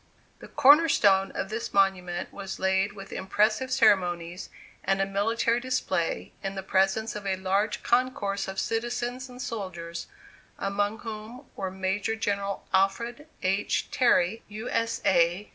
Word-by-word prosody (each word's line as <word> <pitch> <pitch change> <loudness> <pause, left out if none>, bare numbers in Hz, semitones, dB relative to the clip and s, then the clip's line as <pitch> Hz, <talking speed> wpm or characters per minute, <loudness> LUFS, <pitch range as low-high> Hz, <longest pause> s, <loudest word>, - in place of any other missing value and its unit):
The - - -11
corner 295 +3 +6
stone 195 -6 +4
of 195 - -3
this 220 0 -4
monument 185 -3 +1
was 195 -1 -6
laid 190 +2 +1
with 195 -1 -10
impressive 215 +6 +1
ceremonies 180 -6 +2 0.3
and 195 0 +1
a 195 - +2
military 225 +4 +1
display, 240 -9 -1
in 195 0 -4
the 190 - -4
presence 195 +4 +1
of 205 -1 -5
a 190 - +1
large 195 +3 0
concourse 240 -6 0
of 190 0 -4
citizens 240 +2 -2
and 250 0 -11
soldiers, 180 -8 -5 0.5
among 205 +2 -1
whom 225 +4 -8
were 190 -1 -3
Major 190 +3 -1
General 200 -2 -2
Alfred 235 +9 +1 0.2
H. 195 +2 0
Terry, 225 -4 +3
U. 215 +2 -7
S. 230 0 -1
A. 175 +2 +3
200 Hz, 145 wpm, -27 LUFS, 190-230 Hz, 0.5 s, corner